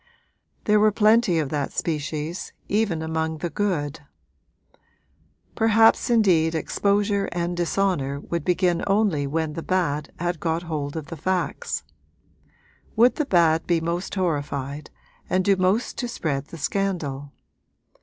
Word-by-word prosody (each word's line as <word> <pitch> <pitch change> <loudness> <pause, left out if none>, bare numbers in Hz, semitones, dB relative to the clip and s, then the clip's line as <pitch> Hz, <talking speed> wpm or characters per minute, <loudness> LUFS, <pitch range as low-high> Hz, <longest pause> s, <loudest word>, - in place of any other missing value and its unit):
There 210 0 +4
were 215 0 +5
plenty 215 -3 +4
of 150 -4 0
that 145 -2 -2
species, 155 +1 -3
even 200 -7 0
among 160 0 -2
the 170 +1 -4
good; 165 -6 -1 1.5
perhaps 225 +1 +4
indeed 180 -9 +3
exposure 200 +4 +1
and 175 0 -2
dishonour 175 -5 0
would 170 +3 -4
begin 175 -1 +1
only 195 -8 +2
when 160 +1 -2
the 165 - -5
bad 155 -5 -1
had 175 -1 -2
got 165 +1 -1
hold 150 -3 -4
of 155 - -5
the 165 - -6
facts. 185 +3 -2 1.1
Would 235 +3 +4
the 300 - 0
bad 165 - +3
be 170 -2 +2
most 170 +4 -3
horrified 145 -5 -2 0.4
and 185 0 +1
do 200 - +4
most 190 +5 0
to 245 - -1
spread 145 - -2
the 165 - -10
scandal? 150 -6 -2
170 Hz, 135 wpm, -24 LUFS, 155-195 Hz, 1.5 s, were